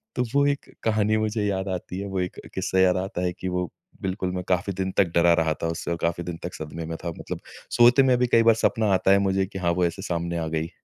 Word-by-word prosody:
तो 125 Hz, -, +1 dB
वो 140 Hz, 0 st, +5 dB
एक 145 Hz, 0 st, -2 dB
कहानी 110 Hz, -1 st, +2 dB
मुझे 110 Hz, 0 st, -1 dB
याद 95 Hz, -1 st, -1 dB
आती 90 Hz, 0 st, -4 dB
है। 100 Hz, -, -4 dB
वो 95 Hz, -1 st, -2 dB
एक 90 Hz, 0 st, -3 dB, 0.2 s
क़िस्सा 95 Hz, -, 0 dB
याद 95 Hz, 0 st, +4 dB
आता 95 Hz, 0 st, -3 dB
है 90 Hz, -1 st, 0 dB
कि 95 Hz, -, -4 dB
वो 90 Hz, -2 st, -1 dB, 0.3 s
बिल्कुल 95 Hz, -1 st, -2 dB
मैं 90 Hz, -, -3 dB
काफ़ी 95 Hz, +2 st, +1 dB
दिन 95 Hz, +1 st, -2 dB
तक 95 Hz, -, +5 dB
डरा 85 Hz, 0 st, +5 dB
रहा 80 Hz, -1 st, +2 dB
था -, -, +1 dB
उससे 85 Hz, -, -4 dB
और 85 Hz, -, -1 dB
काफ़ी 85 Hz, +1 st, -1 dB
दिन 85 Hz, -2 st, -5 dB
तक 85 Hz, -, -5 dB
सदमे 80 Hz, +1 st, -6 dB
में 80 Hz, +1 st, -5 dB
था। 85 Hz, -, -2 dB
मतलब -, -, -5 dB, 0.3 s
सोते 120 Hz, +3 st, +6 dB
में 130 Hz, -2 st, +4 dB
भी 125 Hz, -, +3 dB
कई 115 Hz, -1 st, +4 dB
बार 115 Hz, -1 st, +6 dB
सपना 110 Hz, -1 st, +1 dB
आता 95 Hz, +1 st, +3 dB
है 100 Hz, -, +6 dB
मुझे 95 Hz, -1 st, +1 dB
कि 95 Hz, 0 st, -7 dB
हाँ, 85 Hz, -2 st, +1 dB
वो 90 Hz, +1 st, +1 dB
ऐसे 85 Hz, +3 st, -3 dB
सामने 85 Hz, -2 st, -2 dB
आ 80 Hz, -, -2 dB
गई। 80 Hz, +1 st, -2 dB
95 Hz, 270 wpm, -25 LUFS, 85-105 Hz, 0.3 s, सोते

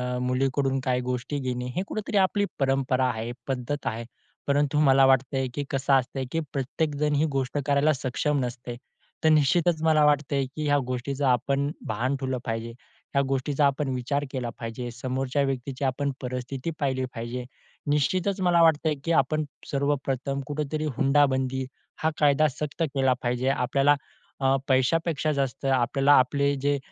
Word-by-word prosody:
अ, 125 Hz, -, -2 dB
मुलीकडून 135 Hz, +1 st, 0 dB
काही 125 Hz, -1 st, +1 dB
गोष्टी 125 Hz, +3 st, -3 dB
घेणे 125 Hz, -2 st, -3 dB
हे 185 Hz, -, 0 dB
कुठेतरी 215 Hz, -1 st, -2 dB
आपली 200 Hz, +1 st, +3 dB
परंपरा 135 Hz, -1 st, +1 dB
आहे, 115 Hz, 0 st, -3 dB, 0.2 s
पद्धत 135 Hz, +2 st, -3 dB
आहे. 115 Hz, +1 st, -3 dB, 0.4 s
परंतु 145 Hz, +1 st, +2 dB
मला 135 Hz, -2 st, +6 dB
वाटते, 135 Hz, 0 st, +2 dB
की 145 Hz, -, -2 dB
कसं 135 Hz, 0 st, +1 dB
असतं, 130 Hz, 0 st, +1 dB
की 165 Hz, -, 0 dB
प्रत्येकजण 150 Hz, +2 st, -1 dB
ही 150 Hz, +2 st, +3 dB
गोष्ट 135 Hz, +2 st, -2 dB
करायला 145 Hz, +2 st, +3 dB
सक्षम 140 Hz, +3 st, -1 dB
नसते 120 Hz, 0 st, -6 dB, 0.5 s
तर 160 Hz, -, +5 dB
निश्चितच 155 Hz, +2 st, +3 dB
मला 155 Hz, -1 st, +4 dB
वाटतंय, 140 Hz, -2 st, +2 dB
की 150 Hz, +4 st, -6 dB
ह्या 145 Hz, 0 st, +3 dB
गोष्टीचं 135 Hz, +3 st, -2 dB
आपण 135 Hz, +3 st, +1 dB, 0.2 s
भान 120 Hz, +5 st, -1 dB
ठेवलं 130 Hz, -1 st, -2 dB
पाहिजे. 115 Hz, 0 st, -3 dB, 0.5 s
ह्या 140 Hz, -, +5 dB
गोष्टीचा 135 Hz, +2 st, +1 dB
आपण 140 Hz, 0 st, +1 dB
विचार 140 Hz, +3 st, -1 dB
केला 125 Hz, -3 st, -3 dB
पाहिजे, 120 Hz, +1 st, -5 dB
समोरच्या 130 Hz, +3 st, -2 dB
व्यक्तीची 135 Hz, 0 st, -3 dB
आपण 140 Hz, +2 st, 0 dB
परिस्थिती 130 Hz, +4 st, -4 dB
पाहिली 130 Hz, -2 st, 0 dB
पाहिजे. 120 Hz, +2 st, -5 dB, 0.5 s
निश्चितच 185 Hz, +7 st, +1 dB
मला 175 Hz, -2 st, +4 dB
वाटतंय, 155 Hz, -1 st, +3 dB
की 170 Hz, -, -1 dB
आपण 155 Hz, 0 st, +2 dB, 0.3 s
सर्वप्रथम 140 Hz, -1 st, -1 dB
कुठेतरी 150 Hz, +1 st, -2 dB
हुंडाबंदी 135 Hz, -2 st, +2 dB, 0.4 s
हा 160 Hz, -, +4 dB
कायदा 150 Hz, +1 st, +4 dB
सक्त 150 Hz, +4 st, -4 dB
केला 135 Hz, -2 st, +3 dB
पाहिजे. 125 Hz, +2 st, 0 dB
आपल्याला 135 Hz, +2 st, +3 dB, 0.5 s
अ, 135 Hz, 0 st, +3 dB
पैशापेक्षा 155 Hz, +4 st, +1 dB
जास्त 135 Hz, -2 st, -2 dB
आपल्याला 135 Hz, +2 st, +3 dB
आपले 140 Hz, +2 st, +1 dB
जे 145 Hz, 0 st, +2 dB
135 Hz, 150 wpm, -26 LUFS, 130-145 Hz, 0.5 s, मला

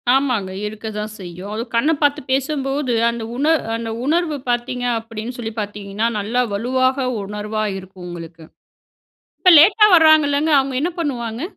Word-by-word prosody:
ஆமாங்க. 250 Hz, -9 st, 0 dB, 0.2 s
இருக்க 215 Hz, +1 st, -8 dB
தான் 210 Hz, 0 st, -4 dB
செய்யும். 180 Hz, +2 st, -8 dB
அதுவும் 230 Hz, +2 st, -5 dB
கண்ண 280 Hz, +7 st, +3 dB
பார்த்து 290 Hz, 0 st, +2 dB
பேசும்போது, 270 Hz, -1 st, -1 dB, 0.2 s
அந்த 235 Hz, -1 st, -4 dB
உண 275 Hz, +4 st, -1 dB, 0.3 s
அந்த 230 Hz, 0 st, -4 dB, 0.2 s
உணர்வு 315 Hz, -1 st, 0 dB
பார்த்தீங்க 245 Hz, +1 st, -1 dB
அப்படின்னு 225 Hz, +2 st, -7 dB
சொல்லி 225 Hz, -2 st, -5 dB
பார்த்தீங்கன்னா, 205 Hz, +1 st, -3 dB
நல்லா 225 Hz, +5 st, 0 dB
வலுவாக 255 Hz, +4 st, 0 dB, 0.2 s
உணர்வா 210 Hz, +2 st, -4 dB
இருக்கும் 190 Hz, -1 st, -11 dB
உங்களுக்கு. 165 Hz, -1 st, -9 dB, 1.0 s
இப்ப 365 Hz, -, +6 dB
லேட்டா 415 Hz, +7 st, +7 dB
வராங்கல்லங்க 310 Hz, -1 st, +4 dB
அவங்க 270 Hz, -1 st, -3 dB
என்ன 345 Hz, -, 0 dB
பண்ணுவாங்க? 240 Hz, -5 st, -3 dB
240 Hz, 140 wpm, -20 LUFS, 210-285 Hz, 1.0 s, லேட்டா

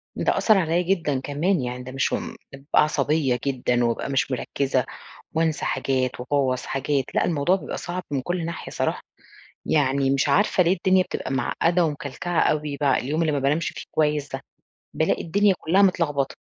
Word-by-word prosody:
ده -, -, 0 dB
أثّر 215 Hz, -2 st, +4 dB
عليّا 170 Hz, -1 st, +1 dB
جدًا 170 Hz, -7 st, 0 dB
كمان 145 Hz, +5 st, 0 dB
يعني، 125 Hz, 0 st, -4 dB
ده 130 Hz, -, -8 dB
مش 135 Hz, +1 st, 0 dB
هُم -, -, -3 dB, 0.2 s
بابقى 140 Hz, +2 st, +2 dB
عصبية 150 Hz, -3 st, +1 dB
جدًا 125 Hz, -3 st, 0 dB
وأبقى 115 Hz, +3 st, -1 dB
مش 135 Hz, 0 st, 0 dB
مركّزة 130 Hz, 0 st, -1 dB, 0.5 s
وأنسى 160 Hz, -1 st, 0 dB
حاجات 130 Hz, -2 st, -1 dB
وأبوّظ 130 Hz, -1 st, 0 dB
حاجات، 135 Hz, 0 st, -1 dB
لأ، -, -, +2 dB
الموضوع 170 Hz, +3 st, +2 dB
بيبقى -, -, -6 dB
صعب 180 Hz, +1 st, -4 dB
من 135 Hz, -3 st, -1 dB
كل 175 Hz, +1 st, -2 dB
ناحية 170 Hz, -, -6 dB
صراحة. -, -, -1 dB, 0.6 s
يعني 140 Hz, -2 st, +2 dB
مش 135 Hz, -1 st, +1 dB
عارفة 200 Hz, -2 st, +3 dB
ليه 175 Hz, +2 st, +3 dB
الدنيا 185 Hz, +1 st, +3 dB
بتبقى -, -, -5 dB
معقدة 165 Hz, +6 st, +1 dB
ومكلكعة 150 Hz, +3 st, -3 dB
أوي، 150 Hz, -2 st, 0 dB
بع 140 Hz, -3 st, +2 dB
اليوم 150 Hz, +5 st, -1 dB
اللي 160 Hz, -2 st, +1 dB
ما 145 Hz, -, 0 dB
بانامشِ 145 Hz, +5 st, +1 dB
فيه -, -, -8 dB
كويس 150 Hz, -2 st, 0 dB
ده، -, -, -4 dB, 0.5 s
بالاقي -, -, +1 dB
الدنيا 200 Hz, +3 st, +3 dB
كلها 185 Hz, +5 st, +2 dB
متلغبطة. 150 Hz, -8 st, +1 dB
145 Hz, 175 wpm, -24 LUFS, 135-170 Hz, 0.6 s, أثّر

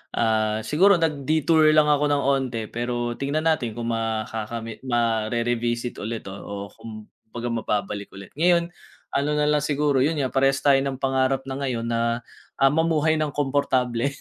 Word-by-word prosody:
ah, 110 Hz, -1 st, +1 dB
siguro 195 Hz, -, +4 dB
nag-detour 155 Hz, 0 st, +2 dB
lang 150 Hz, -1 st, +5 dB
ako 150 Hz, 0 st, +2 dB
ng 145 Hz, -1 st, +1 dB
onte 135 Hz, -4 st, 0 dB
pero 120 Hz, 0 st, -3 dB
tignan 145 Hz, +3 st, -1 dB
natin 145 Hz, -9 st, 0 dB
kung 120 Hz, 0 st, -3 dB
makakami 115 Hz, 0 st, -3 dB
mare-revisit 120 Hz, 0 st, -1 dB
ulit, 110 Hz, +1 st, -4 dB
oo. 100 Hz, 0 st, -7 dB
Kumbaga 115 Hz, +2 st, -8 dB
mababalik 105 Hz, -3 st, -2 dB
ulit. 100 Hz, 0 st, -11 dB
Ngayon, 170 Hz, 0 st, +3 dB, 0.4 s
ano 140 Hz, +1 st, 0 dB
nalang 150 Hz, 0 st, +2 dB
siguro, 145 Hz, -2 st, +1 dB
yun 150 Hz, +5 st, +2 dB
nga, 135 Hz, -4 st, -1 dB
parehas 135 Hz, 0 st, +2 dB
tayo 140 Hz, -1 st, +5 dB
ng 135 Hz, 0 st, -2 dB
pangarap 135 Hz, 0 st, +1 dB
na 135 Hz, 0 st, -5 dB
ngayon 125 Hz, -4 st, -2 dB
na, 115 Hz, +1 st, 0 dB, 0.3 s
ah, 135 Hz, 0 st, +4 dB
mamuhay 160 Hz, 0 st, +2 dB
ng 150 Hz, -2 st, -2 dB
komportable. 135 Hz, -2 st, 0 dB
130 Hz, 150 wpm, -24 LUFS, 115-145 Hz, 0.4 s, lang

